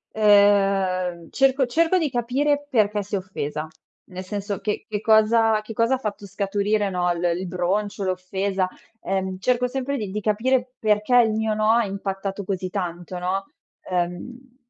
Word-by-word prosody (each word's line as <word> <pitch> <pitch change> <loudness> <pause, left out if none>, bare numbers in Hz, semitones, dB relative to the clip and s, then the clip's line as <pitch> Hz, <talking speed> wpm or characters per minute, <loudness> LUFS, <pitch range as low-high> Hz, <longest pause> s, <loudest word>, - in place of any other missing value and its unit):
Ehm 195 -4 +3
cerco 270 0 +3
cerco 335 +7 +2
di 315 -5 0
capire 280 +5 0
perché 210 -3 +2
si 205 +1 -4
è - - +2
offesa, 155 -5 -4 0.4
nel 185 0 -8
senso 200 +1 -4
che 210 +1 -3
che 210 -1 -3
cosa 220 0 +4
che 220 +1 -8
cosa 230 +4 +2
ha - - -3
fatto 205 -3 -5
scaturire, 200 +1 0
no, 180 -1 0
l 170 +1 -5
il 185 0 -4
broncio, 195 +3 -1
l'offesa, 190 +1 -1 0.3
ehm, 190 -1 -2
cerco 250 +4 +1
sempre 270 +2 -3
di 210 -4 -4
di 210 +2 -3
capire 250 +4 +1
perché 210 +3 +2
il 225 -2 +5
mio 220 0 0
no 215 0 +1
ha 235 -1 +3
impattato 195 0 -4
così 185 -1 -3
tanto, 180 -2 -4
no. 190 +2 -2 0.5
Uhm 235 +9 -4
205 Hz, 165 wpm, -23 LUFS, 190-230 Hz, 0.5 s, il